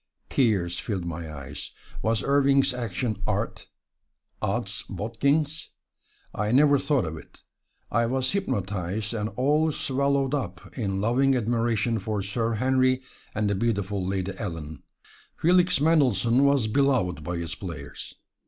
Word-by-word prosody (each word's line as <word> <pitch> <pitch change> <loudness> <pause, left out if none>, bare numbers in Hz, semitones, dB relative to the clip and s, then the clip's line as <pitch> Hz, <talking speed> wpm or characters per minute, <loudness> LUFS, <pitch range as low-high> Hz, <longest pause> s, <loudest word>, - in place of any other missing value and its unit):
Tears 95 -9 +2
filled 95 -6 -3
my 85 -1 -5
eyes. 70 -4 -7 0.3
Was 110 0 +1
Irving's 140 -1 +3
action 115 -2 -3
art? 110 +1 -2 0.7
Ods - - -1
bodkins! 140 +8 0 0.6
I 105 +1 -1
never 140 +2 +5
thought 140 -9 +1
of 80 0 -5
it: - - -15 0.5
I 115 +1 +2
was 130 +1 0
hypnotized 100 - -2
and 110 -1 -2
all 150 +5 +2
swallowed 140 0 0
up 95 -11 -4
in 100 -6 -1
loving 130 +5 +3
admiration 115 -1 +1
for 105 0 -2
Sir 115 +3 -1
Henry 130 +2 +2 0.3
and 105 0 +1
the 100 - +1
beautiful 100 -2 -1
Lady 95 0 -1
Ellen. 80 -7 -5 0.6
Felix 180 0 +4
Mendelssohn 135 - +3
was 140 -4 +3
beloved 110 - +1
by 85 +2 -3
his 85 0 -4
players. 80 -7 -7
115 Hz, 130 wpm, -26 LUFS, 95-135 Hz, 0.7 s, never